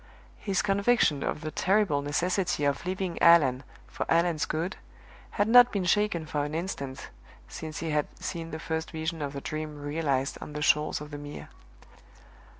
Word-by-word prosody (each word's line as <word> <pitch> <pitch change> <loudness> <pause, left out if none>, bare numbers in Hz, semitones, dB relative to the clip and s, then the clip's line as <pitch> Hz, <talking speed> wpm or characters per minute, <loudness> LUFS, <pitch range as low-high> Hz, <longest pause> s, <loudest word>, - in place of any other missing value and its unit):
His 195 -3 0
conviction 200 -7 +2
of 150 - -2
the 155 -1 -4
terrible 190 -7 +2
necessity 175 +3 0
of 140 +5 -1
leaving 185 -1 -3
Allan 145 -7 +6 0.2
for - - -5
Allan's 165 -2 +2
good 165 +5 -2 0.6
had 205 - +3
not 245 +1 +8
been 195 -3 -1
shaken 190 -3 +1
for 150 -1 -2
an 150 +1 -4
instant 140 -6 -5 0.4
since 155 -1 -7
he 165 -1 -2
had 150 -1 +1
seen 165 -1 -5
the 160 - -5
first 160 0 -3
Vision 160 0 -4
of 140 -1 -3
the 140 - -5
Dream 155 0 -5
realized 145 -2 -1
on 150 - -8
the 150 0 -3
shores 150 -1 +2
of 150 0 -9
the 145 - -6
Mere. 145 0 -9
160 Hz, 170 wpm, -28 LUFS, 145-180 Hz, 0.6 s, not